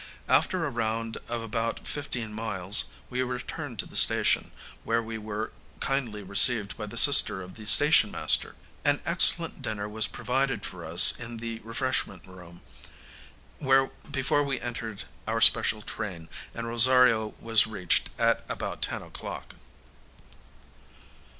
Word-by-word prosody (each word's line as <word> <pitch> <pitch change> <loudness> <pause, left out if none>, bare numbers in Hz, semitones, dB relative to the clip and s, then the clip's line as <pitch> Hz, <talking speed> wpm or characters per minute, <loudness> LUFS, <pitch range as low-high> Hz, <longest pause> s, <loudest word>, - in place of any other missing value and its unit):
After 185 -3 0
a 145 - -5
round 115 -1 -5
of 120 -1 -5
about 115 +1 -5
fifteen 120 -7 -6
miles, 105 -3 0 0.3
we 125 0 -3
returned 125 +1 -7
to - - -6
the - - -14
station, - - +4 0.3
where 115 +1 -1
we 110 0 -8
were 110 +1 -7 0.3
kindly 120 -7 -4
received 100 +2 +3
by 105 -2 -8
the 115 - -9
sister 115 -7 +7
of 90 0 -13
the 110 -1 -12
station 145 -3 +6
master. - - +2 0.3
An - - 0
excellent - - +4
dinner 105 -2 -5
was 105 0 0
provided 130 -3 -4
for 90 -2 -9
us 80 +2 +8
in 120 0 -9
the 115 0 -8
refreshment 115 -6 -4
room, 90 -2 -16 1.5
before 140 +1 -1
we 135 -3 -4
entered 115 -6 -8 0.2
our - - -2
special 105 -1 +3
train, 85 -7 -7 0.3
and 115 - -7
Rosario 115 -2 +3
was 115 -1 +1
reached 95 -5 -1
at - - 0
about - - -6
ten - - -4
o'clock. - - -10
115 Hz, 135 wpm, -25 LUFS, 105-125 Hz, 1.5 s, us